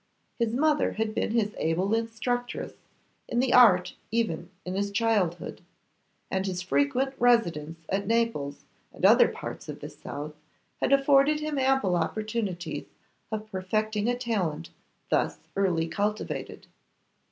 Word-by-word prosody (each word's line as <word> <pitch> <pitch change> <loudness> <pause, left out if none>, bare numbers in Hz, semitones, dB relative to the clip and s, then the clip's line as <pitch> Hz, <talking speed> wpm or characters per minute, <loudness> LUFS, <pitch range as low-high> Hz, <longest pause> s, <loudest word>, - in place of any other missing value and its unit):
His 230 0 +1
mother 300 +2 +2
had 220 0 -1
been - - -1
his 215 -2 +1
able 180 +6 +1
instructress 230 +2 -2 0.5
in 240 - 0
the 255 0 +2
art 200 -8 +6 0.2
even 215 -7 -1 0.2
in 180 - -3
his 200 +1 -1
childhood, 200 -5 0 0.7
and 190 +1 0
his 185 -1 -3
frequent 185 - +1
residence 165 -10 +2
at 195 +1 -1
Naples 225 -12 0 0.3
and - - -2
other - - +7
parts - - -7
of - - -6
the - - -7
south 150 +1 -7 0.5
had - - +1
afforded 275 +2 +5
him 305 -2 -2
ample 265 -9 +2
opportunities 195 -1 -2 0.4
of 215 0 -4
perfecting 215 +3 -1
a 245 - 0
talent 185 -10 -2 0.4
thus - - +1 0.2
early 180 -4 +1
cultivated. 205 +5 -3
215 Hz, 130 wpm, -27 LUFS, 180-235 Hz, 0.7 s, other